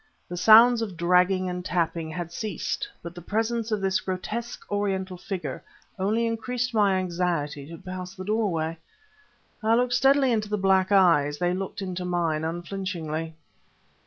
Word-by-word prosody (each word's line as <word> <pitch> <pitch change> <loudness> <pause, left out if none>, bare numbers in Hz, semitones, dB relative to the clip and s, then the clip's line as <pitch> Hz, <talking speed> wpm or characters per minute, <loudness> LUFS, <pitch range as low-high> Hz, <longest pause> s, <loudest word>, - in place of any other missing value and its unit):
The 175 - -4
sounds 225 +5 +7
of 200 -6 -4
dragging 180 +1 +3
and 180 0 -4
tapping 170 -2 -1
had 170 +1 -5
ceased. 210 -2 -3
But 170 0 -7
the 175 - -9
presence 225 +4 -1
of 210 -2 0
this 190 0 +1
grotesque 210 +5 -5
Oriental 195 -2 -1
figure 175 -7 -5 0.4
only 215 +5 +1
increased 245 +2 -2
my 205 -3 +3
anxiety 170 -6 -2
to 165 +1 -9
pass 185 +1 -7
the 185 - -7
doorway. 170 -7 -1 0.8
I 220 +1 +3
looked 245 0 +1
steadily 270 +1 +4
into 215 -2 0
the 210 - 0
black 190 0 +2
eyes; 165 -7 +4
they 175 +1 0
looked 195 +1 -4
into 185 -1 -4
mine 170 -3 0
unflinchingly. 165 -2 -4
185 Hz, 155 wpm, -26 LUFS, 175-215 Hz, 0.8 s, sounds